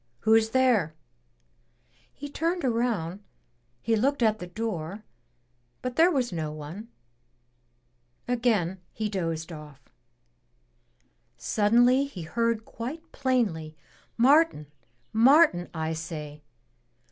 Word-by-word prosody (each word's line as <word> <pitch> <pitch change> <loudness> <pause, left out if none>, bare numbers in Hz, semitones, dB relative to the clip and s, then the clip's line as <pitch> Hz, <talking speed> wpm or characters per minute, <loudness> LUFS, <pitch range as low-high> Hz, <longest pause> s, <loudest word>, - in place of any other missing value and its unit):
"Who's 220 0 +4
there?" 225 -11 +2 1.2
He 290 - -8
turned 330 +3 -2
around, 225 -8 -1 0.6
he 225 - +2
looked 265 +4 +1
at 215 -1 +2
the 180 - -7
door, 200 -1 -5 0.8
but 255 -1 -3
there 335 +2 +5
was 260 - 0
no 160 -3 -3
one. 155 +9 -8 1.4
Again 225 -7 0
he 215 0 -3
dozed 165 -4 -3
off. 150 -4 -12 1.5
Suddenly 245 +6 +3
he 200 -12 -8
heard 230 +5 -1
quite 315 +8 -7
plainly, 200 - -1 0.4
"Martin, 260 - +3 0.4
Martin, 240 - +5
I 160 -1 -3
say! 155 -2 -7
220 Hz, 100 wpm, -27 LUFS, 165-255 Hz, 1.5 s, there